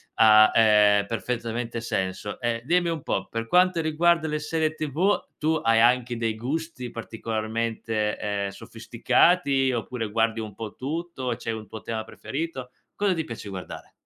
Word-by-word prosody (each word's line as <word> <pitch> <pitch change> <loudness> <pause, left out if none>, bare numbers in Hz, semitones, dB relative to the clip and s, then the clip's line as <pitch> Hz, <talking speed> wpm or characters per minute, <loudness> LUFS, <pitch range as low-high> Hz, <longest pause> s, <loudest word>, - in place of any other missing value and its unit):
ha, 110 -1 +7
ehm, 105 -2 +5
perfettamente 115 +1 -3
senso. 100 -3 -3
E 120 -1 -1
dimmi 175 +3 +2
un 160 -4 -3
po', - - -2
per 115 0 -3
quanto 180 +3 +4
riguarda 160 +1 +2
le 150 0 -2
serie 155 0 -1
TV, 155 +6 0 0.2
tu 155 +1 +1
hai 115 0 +4
anche 120 0 +3
dei 115 -1 -1
gusti 135 +2 -4
particolarmente, 110 -1 -3
ehm, 100 -1 -2
sofisticati, 135 - +1
oppure 115 -1 -3
guardi 115 +1 +1
un 110 -3 -6
po' 110 -1 -6
tutto? 140 -3 -4
C'è 115 - -4
un 110 -1 -6
tuo 110 - -8
tema 110 -1 -4
preferito? 130 +2 -6 0.2
Cosa 200 -2 +1
ti 165 -2 -2
piace 115 -6 -8
guardare? 95 -2 -8
115 Hz, 155 wpm, -25 LUFS, 110-155 Hz, 0.2 s, ha